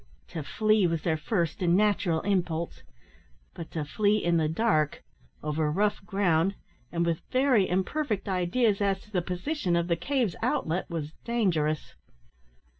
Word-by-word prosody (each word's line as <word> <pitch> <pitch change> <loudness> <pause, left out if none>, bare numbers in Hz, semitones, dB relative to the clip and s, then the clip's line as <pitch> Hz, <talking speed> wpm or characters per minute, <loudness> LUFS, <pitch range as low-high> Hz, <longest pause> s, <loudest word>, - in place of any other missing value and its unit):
To 165 - -4
flee 215 +7 +2
was 165 -2 -2
their 160 -2 +1
first 170 +2 -1
and 175 0 +3
natural 200 -5 +2
impulse; 170 -4 -1 0.7
but 165 - -8
to 155 -3 -3
flee 205 +7 +2
in 175 -4 +1
the 155 -2 +1
dark, 160 -5 +1 0.4
over 150 0 0
rough 205 +4 0
ground, 195 -2 +2 0.4
and 170 0 0
with 165 -1 0
very 255 -6 +3
imperfect 205 +4 -1
ideas 195 +3 +1
as 195 -1 +1
to 210 - -19
the 185 -4 +1
position 180 - -1
of 170 0 +1
the 170 - +3
cave's 235 - 0
outlet, 165 +4 -1
was 160 -3 -4
dangerous. 170 -10 0
180 Hz, 150 wpm, -28 LUFS, 165-210 Hz, 0.7 s, and